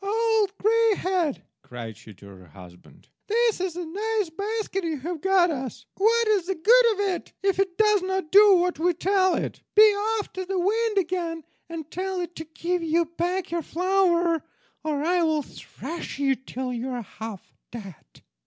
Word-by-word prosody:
"Old 435 -1 +1
Greyhead," 395 - +1 0.2
cried 115 -3 -8
she 110 - -14
to 100 - -16
her 95 -2 -14
husband, 90 +2 -16 0.2
"this 460 -2 +2
is 370 -3 -2
a 355 -1 -4
nice 415 +2 -2
basket 400 +1 -3
you 325 -2 -2
have 320 +3 -5
got 380 -3 +3
us! 255 -4 -5
What 460 +3 +2
is 395 -5 +2
the 385 - -1
good 465 +7 +5
of 405 - -9
it 350 - -7
if 390 -1 +1
it 380 -3 0
does 425 -2 +4
not 380 -3 -3
do 405 0 +8
what 355 -3 +1
we 350 +1 +2
tell 375 +1 +2
it? - - -4
Be 425 - +9 0.4
off 410 - -6
to 375 - -4
the 380 +1 -3
wind 425 +4 +1
again, 335 -3 -1 0.3
and 320 -2 -7
tell 375 +1 -3
it 350 -1 -5
to 320 - -6
give 340 +3 -2
you 330 +1 +1
back 355 +1 -2
your 340 0 -1
flour, 345 -1 +1 0.4
or 300 -2 -1
I 350 +2 +2
will 315 -3 +1
thrash 315 +4 -8
you 275 -1 +2
till 260 0 -5
you 245 +2 -4
are 245 -2 -4
half 220 -2 -9 0.2
dead." 195 - -11
355 Hz, 180 wpm, -25 LUFS, 310-395 Hz, 0.4 s, Be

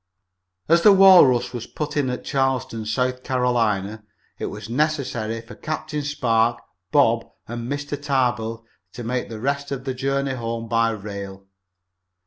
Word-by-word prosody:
As 170 +2 +5
the 205 - +8
Walrus 180 -12 +6
was 120 -2 -5
to - - -29
put 150 0 -4
in 140 -3 +1
at 125 - -4
Charleston, 130 -5 -1
South 125 +3 -1
Carolina, 110 -5 0 0.4
it - - -2
was - - -7
necessary 125 -4 -1
for 115 +1 -12
Captain 155 -1 -4
Spark, 120 -5 +1 0.3
Bob - - +3 0.2
and 120 +2 -5
Mr. 145 0 -4
Tarbill 120 -5 -1 0.3
to 120 - -7
make 125 +2 -2
the 110 -2 -7
rest 140 +3 -2
of 135 -2 -4
the 130 -1 -3
journey 135 +1 -1
home 115 -2 -4
by 115 0 +2
rail. 100 -2 -7
125 Hz, 150 wpm, -23 LUFS, 115-140 Hz, 0.4 s, the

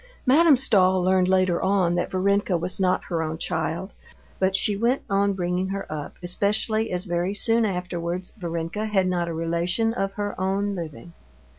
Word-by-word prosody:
Madame 295 +2 +6
Stahl 190 -7 +3
learned 185 0 +3
later 185 -2 +2
on 190 -3 +2
that 175 - -1
Varenka 195 0 +1
was 175 +3 -1
not 185 -1 +1
her 170 -3 -2
own 160 0 -3
child, 165 +3 -3 0.5
but 190 0 +2
she 205 +1 +2
went 235 +6 0
on 200 0 +2
bringing 180 0 -1
her 195 +1 -4
up, 150 -2 -6
especially 210 +4 0
as 180 +2 -2
very 175 +2 -1
soon 225 +1 +2
afterwards 180 -2 -3
Varenka 170 +1 -4
had 195 -3 +2
not 175 -2 0
a 170 - -3
relation 170 +7 0
of 195 -4 -2
her 205 0 -3
own 200 +2 0
living. 170 -1 -7
185 Hz, 170 wpm, -24 LUFS, 175-200 Hz, 0.5 s, Madame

